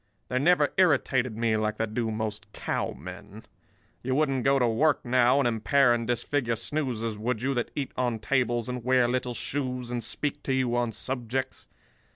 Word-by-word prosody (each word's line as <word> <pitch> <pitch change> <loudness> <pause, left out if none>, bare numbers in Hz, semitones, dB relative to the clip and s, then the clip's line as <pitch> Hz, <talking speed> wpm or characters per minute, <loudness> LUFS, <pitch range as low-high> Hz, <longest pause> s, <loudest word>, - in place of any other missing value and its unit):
They 130 - 0
never 150 0 +3
irritated 130 - +2
me 115 -1 +1
like 110 0 -1
they 110 - 0
do 115 +1 -2
most 110 -1 -4
cowmen. 95 +5 -5 0.6
You 130 +1 -1
wouldn't 135 -4 +1
go 135 0 +4
to 125 -3 +3
work 135 +8 +2
now, 125 +1 +4
and 140 -3 +3
impair 120 +3 +3
and 115 -1 -2
disfigure 120 0 0
snoozers, 115 -4 -2
would 115 +1 -2
you, 135 +1 +1
that 120 -2 -1
eat 140 -2 -3
on 125 -3 0
tables 120 0 0
and 125 -1 -4
wear 125 0 +3
little 125 0 -1
shoes 125 -3 -3
and 120 -1 -2
speak 145 -1 -3
to 135 - -1
you 130 -2 +1
on 120 -1 0
subjects? 125 +3 -3
120 Hz, 180 wpm, -27 LUFS, 115-130 Hz, 0.6 s, go